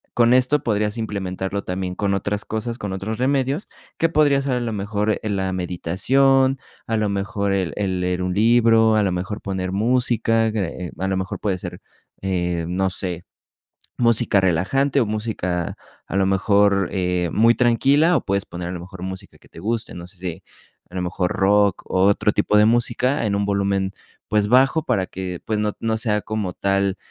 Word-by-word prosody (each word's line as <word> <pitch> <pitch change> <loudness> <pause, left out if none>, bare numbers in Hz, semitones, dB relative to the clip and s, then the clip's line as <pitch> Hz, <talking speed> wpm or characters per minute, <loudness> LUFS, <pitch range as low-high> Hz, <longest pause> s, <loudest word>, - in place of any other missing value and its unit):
Con 120 0 +4
esto 130 +3 +3
podrías 105 -1 0
implementarlo 100 -2 -3
también 90 0 -4
con 100 0 0
otras 100 +1 -2
cosas, 115 +2 -4
con 100 -4 -5
otros 100 +4 -4
remedios, 135 +5 0 0.3
que 165 - +2
podría 150 -3 +3
hacer 140 -1 -1
a 125 - 0
lo 115 -2 -3
mejor 105 +1 -1
en 105 -2 -1
la 95 0 -1
meditación, 130 +10 +2 0.3
a 115 - 0
lo 110 -1 +1
mejor 100 0 -2
el 95 -3 -1
el 95 -3 -1
leer 90 0 -1
un 90 - -1
libro, 115 +1 +4
a 105 - +3
lo 95 - +1
mejor 95 +4 -4
poner 95 -2 -3
música, 115 +1 +1
que 90 -4 -4
a 95 - -2
lo 95 -1 0
mejor 95 0 -4
puede 100 -3 -1
ser, - - -7 0.4
em, 90 -2 -2
no 95 0 +1
sé, 90 -2 -4 0.7
música 115 -4 +3
relajante 130 - +1
o 120 - +2
música 105 -5 -2 0.3
a - - -5
lo 100 -1 +3
mejor, 100 0 +3
eh, 90 -2 0
muy 115 +2 +4
tranquila 140 +7 +3
o - - -1
puedes 100 0 -1
poner 90 0 -6
a - - -3
lo 90 - -5
mejor 90 +1 -10
música 95 0 -7
que - - -22
te - - -13
guste. 110 +4 -3
No 85 0 -8
sé 95 0 -16
si 90 0 -6 0.5
a 90 - -21
lo 90 - -1
mejor 90 0 -1
rock 100 +1 +2
o 95 - +1
otro 100 +1 +3
tipo 105 +1 +2
de 105 - +6
música 120 +3 +1
en 100 -2 0
un 100 0 0
volumen, 100 -1 0 0.4
pues 105 -1 +1
bajo 135 +5 +4
para 105 -9 0
que 90 -2 -5
pues 110 - -1
no 105 -1 0
no 110 -1 -1
sea 105 -2 0
como 105 -4 -3
tal, 100 0 0
100 Hz, 195 wpm, -22 LUFS, 95-115 Hz, 0.7 s, de